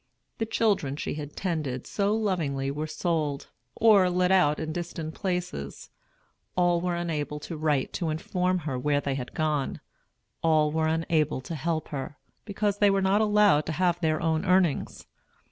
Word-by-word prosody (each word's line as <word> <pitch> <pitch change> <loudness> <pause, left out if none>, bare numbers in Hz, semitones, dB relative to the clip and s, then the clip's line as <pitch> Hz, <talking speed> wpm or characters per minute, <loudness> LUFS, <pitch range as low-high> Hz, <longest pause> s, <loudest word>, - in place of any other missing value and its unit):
The 225 - -1
children 200 -12 +1
she - - -3
had 145 -1 -7
tended 150 -9 -2
so 205 +1 0
lovingly 155 -11 -1
were 150 +2 -3
sold, 155 -4 -2 0.2
or 205 -5 +5
let 180 +1 +2
out 150 -6 +4
in 155 0 -3
distant 165 -2 -5
places; 180 - -4 0.7
all 175 -1 +3
were 180 -1 -1
unable 155 -4 -3
to 165 - -6
write 150 -3 0
to 170 -3 -2
inform 180 +4 0
her 135 -5 -2
where 145 +2 +1
they 140 -1 -2
had 130 -2 -6
gone; 150 -3 -1 0.6
all 155 -2 +3
were 160 0 +1
unable 160 -2 +1
to 165 - -7
help 160 +1 -2
her, 145 +1 -5 0.3
because 205 -1 -1
they 205 - +5
were 195 0 +2
not 195 +3 +3
allowed 210 -7 +4
to 160 - -1
have 175 +1 +1
their 155 -3 +1
own 160 -1 0
earnings. 180 -5 +1
160 Hz, 165 wpm, -27 LUFS, 150-185 Hz, 0.7 s, or